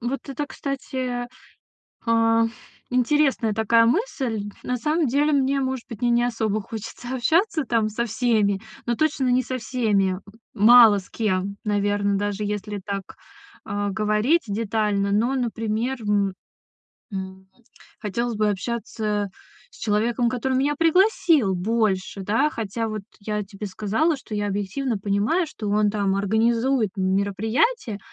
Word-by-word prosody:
вот 250 +3 -4
это, 285 +2 -3
кстати, 260 -3 -4 0.8
а, 230 0 +3 0.4
интересная 255 -3 +2
такая 230 +2 +4
мысль. 250 - 0 0.2
На 250 0 -1
самом 310 +4 +1
деле, 290 +4 +2
мне, 275 0 +2
может 260 -2 -2
быть, 230 - -8
мне 245 - +2
не 240 0 +3
особо 220 -3 -1
хочется 225 +4 -7
общаться 320 - +2
там 225 -2 +1
со 235 +3 -2
всеми, 215 -4 +1 0.2
но 240 - 0
точно 285 -2 +1
не 250 +1 +3
со 255 +1 -3
всеми. 220 -6 +1
М, 185 - -7 0.3
мало 225 -1 +7
с 185 - -14
кем, 200 -2 -1
наверно, 205 -1 +1
даже 205 +1 -2
если 205 0 -3
так, 195 -1 -5 0.5
а, 205 -1 -2
говорить 215 - +2
детально, 205 -1 0
но, 230 +6 +2
например, 230 0 -1
м, 205 -2 +1 0.8
м, 190 0 -6 0.5
хотелось 235 +2 -2
бы 215 0 +2
общаться 210 0 -2 0.4
с - - -18
человеком, 230 +3 +1
который 255 +2 -1
меня 285 +3 +1
пригласил 330 - +3
больше, 195 -1 0
да? 225 +10 +2
Хотя 225 -2 -3
вот 215 -2 -4 0.2
я 210 0 -2
тебе 200 +1 -7
сказала, 215 - 0
что 230 -5 -8
я 205 0 -1
объективно 205 +5 -2
понимаю, 205 - +1
что 215 -8 -6
он 210 0 +2
там 200 -2 0
организует 225 +3 +2
мероприятие 200 - 0
225 Hz, 140 wpm, -23 LUFS, 205-255 Hz, 0.8 s, мало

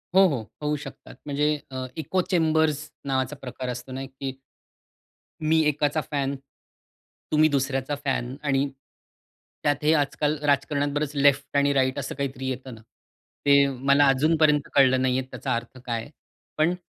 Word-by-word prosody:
हो, 195 +1 +8
हो. 140 -9 -1 0.2
होऊ 150 0 +1
शकतात. - - -11
म्हणजे 150 +1 +1 0.2
अ, 130 0 -4
इको 185 +4 0
चेंबर्स 160 -3 +2 0.2
नावाचा 135 +1 -1
प्रकार 130 0 -5
असतो 125 +1 -6
ना 135 +1 -4
की, 135 0 -6 1.1
मी 160 +1 +3
एकाचा 150 +1 +1
फॅन 140 -1 -1 1.0
तुम्ही 155 +1 +5
दुसऱ्याचा 135 0 -1
फॅन 130 -2 -1
आणि, 140 -1 +1 0.9
त्यात 145 0 +1
हे 155 - +5
आजकाल 145 +1 +1
राजकारणात 145 0 +1
बरंच 150 0 -1
लेफ्ट 140 0 +2
आणि 140 0 +3
राइट 130 0 +1
असं 140 - -4
काहीतरी 135 -1 -3
येतं 130 -1 -5
ना, 110 - -14 0.7
ते 140 0 +6
मला 140 +2 +3
अजून 155 +5 +3
पर्यंत 150 -2 +3
कळलं 130 -2 +5
नाहीये 130 0 +1
त्याचा 130 - -2
अर्थ 120 +2 -5
काय 115 -2 -2
आहे? 145 - -12 0.5
पण 165 +3 +3
140 Hz, 155 wpm, -25 LUFS, 130-150 Hz, 1.1 s, हो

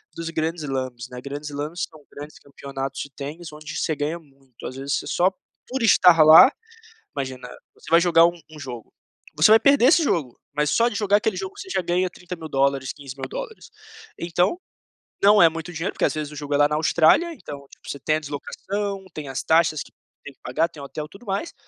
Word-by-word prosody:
dos 165 0 -5
grandes 160 0 -2
slams, 130 -3 -4
né, 125 0 -8
grandes 145 +3 -6
slams 150 +5 -4
são 155 -2 -18
grandes 145 +2 -10
campeonatos 135 -1 -7
de 140 - -7
tênis 150 +4 -8
onde 150 0 -9
você 155 - -1
ganha 150 +4 -3
muito, 135 -5 -17
às 130 - -8
vezes 140 +1 -2
você - - -9
só 185 +2 +2 0.4
por 260 -1 -3
estar 180 -7 +6
lá 160 - +9 0.7
Imagina, 130 -2 -5 0.3
você - - -14
vai 170 - +6
jogar 170 -1 +5
um 175 0 -3
um 155 - -12
jogo, 125 -5 -8 0.4
você 155 +7 +5
vai 225 - +7
perder 270 +1 +5
esse 325 +3 +5
jogo, 150 - -1 0.2
mas 150 0 +1
só 235 +1 +3
de 240 - -7
jogar 205 -1 +3
aquele 210 -3 -1
jogo 190 0 -5
você - - -9
já 190 -1 0
ganha 180 +2 0
$30.000, 140 -7 -2
$15.000. 150 - -8 0.5
Então, 175 - 0 0.7
não 205 +1 +7
é 165 - +8
muito 165 +1 -7
dinheiro, 165 +4 -3
porque, - - 0
às - - 0
vezes, 150 -1 -4
o - - -10
jogo 145 0 -4
é - - +3
lá 145 0 +5
na 150 - 0
Austrália, 160 - +3
então, 140 - -10
tipo, - - -15
você 140 - -5
tem 155 +3 +1
a - - -3
deslocação, 195 +7 -5
tem 150 -2 -7
as 135 - -3
taxas 160 -2 +3
que - - -19 0.3
tem 145 - -10
que - - -41
pagar, 155 +7 0
tem 145 - -12
hotel, 150 +2 -6
tudo 195 +5 -15
mais, 200 - -3
155 Hz, 210 wpm, -23 LUFS, 140-180 Hz, 0.7 s, lá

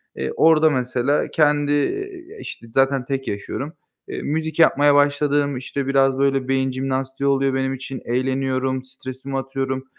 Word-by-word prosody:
Eee, 65 - -3
orada 160 -1 +5
mesela 130 +1 0
kendi, 145 -1 +2
ııı, 385 - -2
işte 115 - -9
zaten 135 -1 +2
tek 135 -1 -3
yaşıyorum. 135 - -4 0.3
Eee, - - -5
müzik 160 +1 -2
yapmaya 145 -3 +5
başladım. 145 -1 +2
İşte 130 +2 -4
biraz 135 -1 +3
böyle 135 -1 +1
beyin 135 0 +1
jimnastiği 135 +1 -2
oluyor 135 -1 +2
benim 135 0 0
için, 135 0 -6
eğleniyorum, 130 +1 -1
stresimi 130 +1 -6
atıyorum. 135 0 -3
135 Hz, 145 wpm, -22 LUFS, 130-145 Hz, 0.3 s, orada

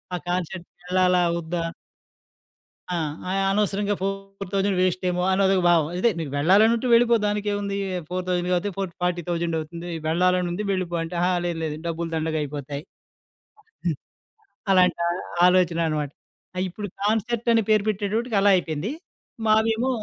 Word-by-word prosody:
ఆ - - -1
కాన్సెర్ట్‌కెళ్ళాలా 180 0 0 0.2
వద్దా? 170 +1 -3 1.3
ఆ! - - 0 0.3
అయనవసరంగా 200 +1 +1
4000 195 0 -2
వేస్టేమో 180 0 0
అని 190 - +2
అదొక 190 -1 +3
భావం. 165 -3 +4
అదే 235 +6 +3
నీకు 150 -4 -4
వెళ్ళాలనుంటే 220 - +4
వెళ్ళిపో 235 0 +5
దానికెముంది, 205 -1 -1 0.3
4000 180 -1 -1
కాతే, 180 +3 0
ఫోట్ 190 -3 -3
ఫార్టీ 180 -1 0
థౌసండ్ 170 -1 -1
అవుతుంది 170 +3 -7 0.2
వెళ్ళాలని 180 +2 +2
ఉంది 185 +5 -3
వెళ్ళిపో 180 -2 -2
అంటే, 165 - -7
అహా! 180 +1 +2
లేదు 170 -1 -2
లేదు 155 -2 -2
డబ్బులు 165 0 -3
దండగా 160 0 -1
అయిపోతాయి. 145 0 -5 1.0
హ్మ్. 160 -5 +1 0.8
అలాంటి 180 -2 +4 0.5
ఆలోచనన్నమాట. 165 -5 +1 0.5
అయిప్పుడు 190 +3 -3 0.2
కాన్సెర్టని 225 +2 +1
పేరు 215 -2 +4
పెట్టేటప్పటికి 215 +2 -1
అలా 200 0 +5
అయిపోయింది. 165 - -3 0.6
మాదేమో 225 +3 +3
185 Hz, 125 wpm, -24 LUFS, 170-205 Hz, 1.3 s, వెళ్ళిపో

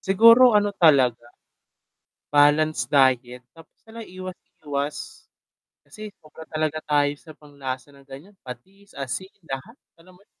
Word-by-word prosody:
siguro 230 +4 +6
ano 205 0 +1
talaga, 130 - +3 1.1
balanced 145 -3 +3
diet. 125 -3 +1
Tapos 165 -1 -19
sana 225 +1 -11
iwas-iwas. 145 - -7 0.6
Kasi 215 +9 -10
sobra 155 +1 -14
talaga 155 0 -3
tayo 145 -1 +1
sa 155 - -14
panglasa 140 -2 -8
na 140 0 -19
ganiyan, 140 +9 -14
patis, 190 +12 -13
asin, 140 +8 -6
lahat, 160 - -8 0.2
alam 180 +2 -19
mo - - -25
'yon, - - -56
150 Hz, 125 wpm, -23 LUFS, 135-185 Hz, 1.1 s, siguro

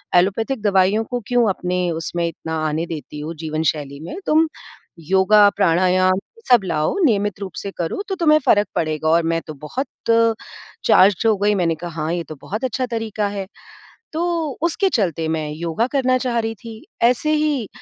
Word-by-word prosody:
Allopathic 215 +7 +1
दवाइयों 200 +1 +3
को 245 +2 -4
क्यों 245 -2 +3
अपने 180 -1 -1
उसमें 165 +1 -2
इतना 160 -1 -5
आने 155 +2 -1
देती 155 -2 -7
हो 155 +3 -5
जीवन 155 0 -2
शैली 140 -2 -8
में। 165 - -7
तुम 315 +1 +3 0.6
योगा, 205 +2 +6
प्राणायाम 185 0 +3 0.3
सब 240 -5 +6
लाओ 155 -3 0
नियमित 205 -5 +1
रूप 195 -2 -5
से 200 - -5
करो 170 - -2
तो 385 - -1
तुम्हें 310 -3 +4
फ़र्क 205 0 +4
पड़ेगा 155 -1 -1
और 170 +1 +4
मैं 165 - -1
तो 155 - -6
बहुत 255 - -4 1.0
चार्ज्ड 200 +3 +5
हो 220 - +4
गई। 205 +1 +2
मैंने 170 -3 +1
कहा 165 0 -6
हाँ, 155 +2 -1
ये 175 -1 -2
तो 155 0 -9
बहुत 215 +5 -5
अच्छा 255 +1 -1
तरीका 225 -3 -2
है 200 -1 -5 0.7
तो 325 +2 -1 0.4
उसके 345 +4 +1
चलते 170 - 0
मैं 155 -2 -2
योगा 170 +9 -1
करना 255 -1 +3
चाह 245 -2 -1
रही 225 0 -2
थी। 225 0 -11 0.2
ऐसे 250 +6 +3
ही 300 -7 0
195 Hz, 180 wpm, -20 LUFS, 165-230 Hz, 1.0 s, योगा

